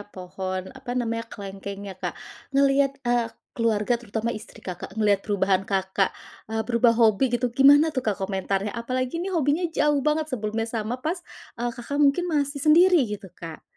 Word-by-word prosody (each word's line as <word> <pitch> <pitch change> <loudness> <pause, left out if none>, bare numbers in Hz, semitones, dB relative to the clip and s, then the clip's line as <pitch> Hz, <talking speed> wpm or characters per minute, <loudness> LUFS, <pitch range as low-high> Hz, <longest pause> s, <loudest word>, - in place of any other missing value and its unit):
pohon 185 0 -5
apa 265 -2 -9
namanya, 230 -1 -1
kelengkengnya 195 -1 -7
Kak. - - -3 0.4
Ngelihat 275 0 +3
eee, 240 -1 +1 0.2
keluarga, 230 0 +1
terutama 230 0 -3
istri 215 - -9
Kakak, 185 +1 -7
ngelihat 205 -2 +3
perubahan 195 -2 +2
Kakak, 190 0 +1 0.4
eee, 220 0 -1
berubah 235 0 +3
hobi 225 +2 +4
gitu, 250 0 -1
gimana 285 +5 +6
tuh 260 - -1
Kak, 205 - +1
komentarnya? 195 +1 -2
Apalagi 255 +5 -2
ini 380 - -3
hobinya 315 +3 +2
jauh 295 -2 +2
banget 305 +2 0
sebelumnya 220 -1 -2
sama 225 +1 -2
pas, 345 +3 -1 0.4
eee, 240 0 -1
Kakak 265 +4 -5
mungkin 290 +5 +4
masih 285 -2 0
sendiri, 340 +1 +6
gitu 205 -3 -6
Kak. 165 -2 -9
230 Hz, 160 wpm, -25 LUFS, 200-275 Hz, 0.4 s, gimana